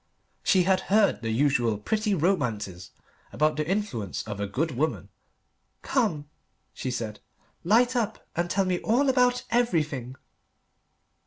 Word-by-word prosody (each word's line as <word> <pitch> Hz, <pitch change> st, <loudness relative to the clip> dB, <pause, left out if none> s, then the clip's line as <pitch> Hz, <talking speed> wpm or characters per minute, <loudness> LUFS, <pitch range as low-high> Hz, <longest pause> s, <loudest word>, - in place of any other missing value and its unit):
She 185 Hz, -2 st, +3 dB
had 190 Hz, +1 st, +3 dB
heard 205 Hz, -5 st, +3 dB
the 115 Hz, -, -3 dB
usual 120 Hz, -2 st, +2 dB
pretty 210 Hz, -, 0 dB
romances 115 Hz, -, -1 dB, 0.4 s
about 155 Hz, +1 st, +1 dB
the 155 Hz, 0 st, -2 dB
influence 185 Hz, -, -2 dB
of 105 Hz, -2 st, -6 dB
a 100 Hz, -, -2 dB
good 145 Hz, +11 st, -1 dB
woman. 150 Hz, +5 st, -2 dB, 0.7 s
"Come," 185 Hz, -, 0 dB, 0.5 s
she 130 Hz, -, -4 dB
said, 110 Hz, -4 st, -4 dB, 0.4 s
"light 240 Hz, +7 st, +3 dB
up 230 Hz, -4 st, -2 dB
and 175 Hz, +1 st, -1 dB
tell 195 Hz, +2 st, +1 dB
me 180 Hz, -1 st, 0 dB
all 260 Hz, +5 st, +2 dB
about 250 Hz, -1 st, +3 dB
everything." 150 Hz, -, 0 dB
160 Hz, 135 wpm, -26 LUFS, -, 0.7 s, She